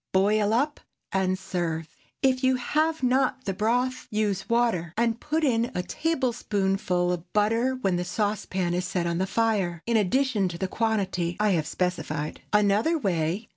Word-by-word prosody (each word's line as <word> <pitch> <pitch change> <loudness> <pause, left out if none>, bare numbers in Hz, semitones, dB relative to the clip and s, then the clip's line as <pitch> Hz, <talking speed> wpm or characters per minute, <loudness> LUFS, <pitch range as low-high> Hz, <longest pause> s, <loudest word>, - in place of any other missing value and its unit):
Boil 205 +2 +3
up 280 +6 +1 0.3
and 185 -1 +1
serve. 175 -4 -3 0.4
If 260 -1 +2
you 260 0 +4
have 310 +4 0
not 260 +1 +1
the 195 - -1
broth, 245 +6 0
use 210 -3 -1
water, 225 -9 +1
and 230 0 +1
put 310 +4 -1
in 235 -4 +2
a 180 - -1
tablespoonful 195 - 0
of 175 0 -7
butter 225 +5 +2
when 195 -8 0
the 175 - -1
saucepan 190 -2 -1
is 180 +1 -1
set 180 -3 -1
on 170 0 -1
the 190 - 0
fire, 195 -6 0
in 235 -1 +2
addition 220 0 +2
to 170 -1 -5
the 190 - -2
quantity 190 -5 -1
I 210 -1 +3
have 160 -5 +1
specified. 165 -4 -2
_Another 210 +10 +3
Way. 185 - -1
205 Hz, 165 wpm, -26 LUFS, 180-240 Hz, 0.4 s, you